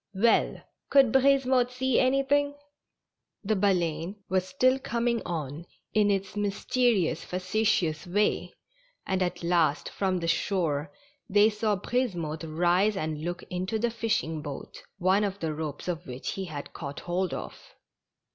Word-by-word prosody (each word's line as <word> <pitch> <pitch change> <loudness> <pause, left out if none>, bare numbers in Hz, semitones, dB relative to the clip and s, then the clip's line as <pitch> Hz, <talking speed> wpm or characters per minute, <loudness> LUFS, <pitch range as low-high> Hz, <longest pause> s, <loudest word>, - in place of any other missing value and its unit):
Well! 225 +4 +3 0.3
could 270 -4 +5
Brisemotte 265 -1 +4
see 255 0 +1
anything? 275 +2 +2 0.9
The 215 +1 +1
Baleine 180 -3 0 0.2
still 255 +7 +2
coming 235 -2 0
on, 160 -1 -4 0.3
in 210 -1 +4
its 195 -1 -1
mysterious, 205 -3 +1
facetious 185 -3 0
way, 205 +4 0 0.5
and 190 0 -1
at 175 -1 -1
last, 170 -4 +2
from 190 -2 0
the 170 -1 -3
shore, 160 -5 0 0.4
they 205 +2 +5
saw 210 0 0
Brisemotte 175 -8 -2
rise 180 +6 +2
and 155 -3 -3
look 175 +2 -4
into 185 +4 -1
the 235 +2 0
fishing 225 -9 -1
boat, 145 -2 -8 0.2
one 190 +2 +3
of 200 -1 -2
the 160 -3 -2
ropes 150 0 -5
of 175 0 -3
which 125 +1 -4
he 195 - -4
had 145 -5 -7
caught 140 -2 -6
hold 180 +1 -1
of. - - -8
190 Hz, 135 wpm, -28 LUFS, 165-225 Hz, 0.9 s, could